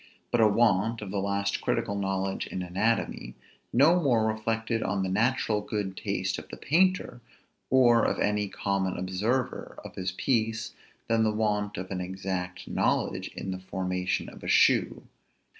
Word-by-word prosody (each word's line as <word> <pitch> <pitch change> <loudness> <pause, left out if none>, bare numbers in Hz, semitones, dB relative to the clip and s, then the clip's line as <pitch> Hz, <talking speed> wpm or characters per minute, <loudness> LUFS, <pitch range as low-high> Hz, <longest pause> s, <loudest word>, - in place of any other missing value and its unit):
But 120 - +3
a 110 - +7
want 110 0 +2
of 95 - -6
the 100 -1 -1
last 100 0 -1
critical 100 - 0
knowledge 95 -1 -2
in 90 - -4
anatomy 90 - -1 0.4
no 160 +8 +5
more 120 -7 +3
reflected 115 +1 -1
on 95 -1 -1
the 95 - -1
natural 110 +1 +1
good 105 -2 -3
taste - - -2
of - - -13
the - - -8
painter, 180 -4 +1 0.5
or 120 -3 +5
of - - +1
any 105 0 +1
common 100 -1 -1
observer 105 +8 -2
of - - -8
his 95 0 -3
piece, 115 +1 -1 0.3
than 115 0 +2
the 110 - +3
want 105 -1 -1
of 95 +1 -6
an 90 -1 -2
exact 90 -1 -4
knowledge - - 0
in 95 - -4
the 95 - -4
formation 90 -1 -2
of - - -12
a - - -6
shoe. - - +3
105 Hz, 160 wpm, -28 LUFS, 95-115 Hz, 0.5 s, a